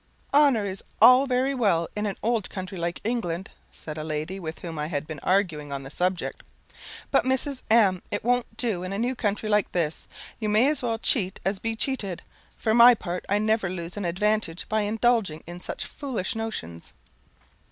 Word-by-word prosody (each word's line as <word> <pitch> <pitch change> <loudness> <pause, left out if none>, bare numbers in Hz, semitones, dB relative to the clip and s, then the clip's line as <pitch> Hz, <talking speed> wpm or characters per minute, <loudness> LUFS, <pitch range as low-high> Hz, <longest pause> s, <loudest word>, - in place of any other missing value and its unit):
"Honour 280 -7 +5
is 190 -1 -5 0.2
all 255 +2 +8
very 260 +2 +1
well 200 -10 +2
in 210 0 -1
an 200 - -4
old 225 -3 0
country 185 -1 -6
like 170 -1 -3
England," 195 -6 -2 0.2
said 155 0 -8
a - - -4
lady, 155 +5 -3
with 160 -3 -6
whom 165 -3 -7
I 150 - -2
had 150 -2 -3
been 155 -2 -7
arguing 160 -7 0
on 140 -1 -4
the 135 - -9
subject; 180 +2 -2 0.7
"but, - - +4
Mrs. 265 +1 -1
M, 200 -5 +4
it 205 - -3
won't 245 -1 0
do 220 -8 0
in 185 +1 -4
a - - -2
new 240 +4 0
country 215 -3 -2
like 210 -2 +2
this. 165 -3 -1 0.3
You 215 -2 -1
may 215 +5 +4
as 300 -2 +1
well 230 -2 -1
cheat 200 -5 +1
as 195 0 0
be 225 +3 -2
cheated. 220 -7 -3 0.3
For 220 - +1
my 240 +1 +9
part, 180 -4 -5
I 200 - +3
never 215 -2 +1
lose 175 -1 -6
an 205 -2 -3
advantage 190 0 0
by 215 0 +1
indulging 215 -5 +1
in 175 +1 -8
such - - -5
foolish 255 -10 -3
notions." 150 - -6
205 Hz, 195 wpm, -26 LUFS, 175-230 Hz, 0.7 s, my